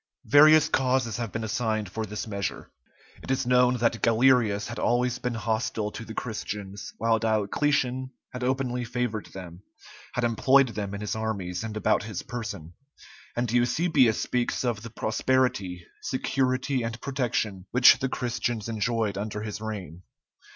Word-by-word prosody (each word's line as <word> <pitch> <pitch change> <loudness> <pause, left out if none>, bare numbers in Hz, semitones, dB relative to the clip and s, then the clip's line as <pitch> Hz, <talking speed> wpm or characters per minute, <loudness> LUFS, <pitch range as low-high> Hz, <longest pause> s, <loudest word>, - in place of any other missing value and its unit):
Various 155 +2 +7
causes 130 -4 +1
have 115 -4 -3
been 110 - -3
assigned 110 -2 -1
for 110 +1 -3
this 105 +1 -4
measure. 100 -3 -4 0.5
It - - -10
is 135 0 +1
known 125 0 +4
that 115 -1 +1
Galerius 115 -3 +3
had 120 - -6
always 125 +1 +1
been 125 -1 -2
hostile 110 -1 -1
to 115 - -7
the 110 -1 -9
Christians, 105 -3 -5
while 115 0 +2
Diocletian 125 +4 0 0.2
had 125 0 -5
openly 125 -1 0
favored 120 -3 -3
them, 90 -2 -10 0.5
had 125 - -1
employed 130 +3 +4
them 100 -2 -4
in 100 - -6
his 105 - -2
armies 100 -4 -3
and 110 -1 -5
about 110 0 +2
his 105 -3 -5
person; 105 -9 -6 0.6
and 120 -1 -1
Eusebius 125 0 +3
speaks 125 +1 -1
of 115 -4 -1
the 115 - -8
prosperity, 110 -6 0 0.2
security, 130 0 0
and 115 0 -4
protection 110 -8 -2
which 125 +2 +7
the 135 -1 -1
Christians 120 -3 -2
enjoyed 110 -2 -1
under 105 0 -4
his 105 -1 -5
reign. 95 -6 -6
115 Hz, 150 wpm, -27 LUFS, 105-125 Hz, 0.6 s, Various